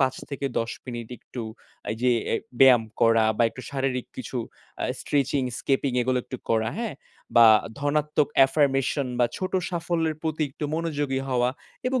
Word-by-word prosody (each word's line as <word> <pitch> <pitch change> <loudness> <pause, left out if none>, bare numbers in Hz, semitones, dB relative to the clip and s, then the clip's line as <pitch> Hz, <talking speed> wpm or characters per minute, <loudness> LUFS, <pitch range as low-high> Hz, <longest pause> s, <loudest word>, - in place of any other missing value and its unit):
৫ 130 -1 +2 0.2
থেকে 140 0 -3
১০ 115 0 -2 0.2
মিনিট 120 -2 -6
একটু 125 - -8 0.5
এই 110 - -2
যে 125 - +4 0.2
অ্যা - - +1 0.2
ব্যায়াম 125 -3 +8 0.2
করা 115 -1 +5
বা - - +3
একটু 130 - -10
শারীরিক 135 -2 -1
কিছু 130 0 -5 0.5
আ - - 0 0.2
স্ট্রেচিং, 140 -1 0 0.2
স্কিপিং 135 -1 0
এগুলো 130 +1 +1
একটু 130 - -6
করা, 110 -1 +2
হ্যাঁ? 230 -8 -3 0.4
বা 115 - +9 0.3
ধনাত্মক 150 +1 +1 0.2
আফারমেশন 135 -1 +1
বা 120 - +4
ছোট 185 - -3 0.2
সাফল্যের 165 -2 -1
প্রতি 160 -1 -1
একটু 140 - -6
মনোযোগী 145 -5 -1
হওয়া 125 -1 +2 0.4
এবং 255 0 +1
135 Hz, 160 wpm, -25 LUFS, 125-150 Hz, 0.5 s, বা